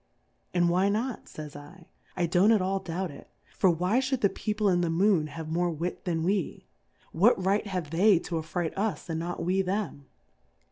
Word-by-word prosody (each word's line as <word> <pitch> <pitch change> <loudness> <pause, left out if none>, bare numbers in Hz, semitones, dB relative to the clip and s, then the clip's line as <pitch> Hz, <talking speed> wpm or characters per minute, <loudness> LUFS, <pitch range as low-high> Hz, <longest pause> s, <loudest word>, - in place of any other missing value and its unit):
And 175 -1 +2
why 185 +3 +3
not, 225 +4 -2
fays 150 -1 -9
I 145 +5 -11
J 165 - -19 0.4
I - - +4
don't 180 +5 +4
at 220 - +5
all 190 +1 0
doubt 180 0 -4
it; 140 - -13 0.3
for 190 - +4
why 180 +8 +2
lliould 265 -1 -1
the 200 - +4
People 210 0 -1
in 175 -2 +3
the 170 - 0
Moon 170 -1 +3
have 160 +1 -7
more 175 +2 +1
Wit 170 +2 -4
than 165 -3 -1
we? 190 0 -1 0.5
What 190 +1 +3
right 205 +2 +1
have 180 -6 -4
they 190 +4 +5
to 170 - -6
afright 165 +1 -2
us 200 -3 -2
and 160 - -2
not 175 +1 -4
we 185 +2 +2
them 190 -7 -3
180 Hz, 200 wpm, -28 LUFS, 165-200 Hz, 0.5 s, at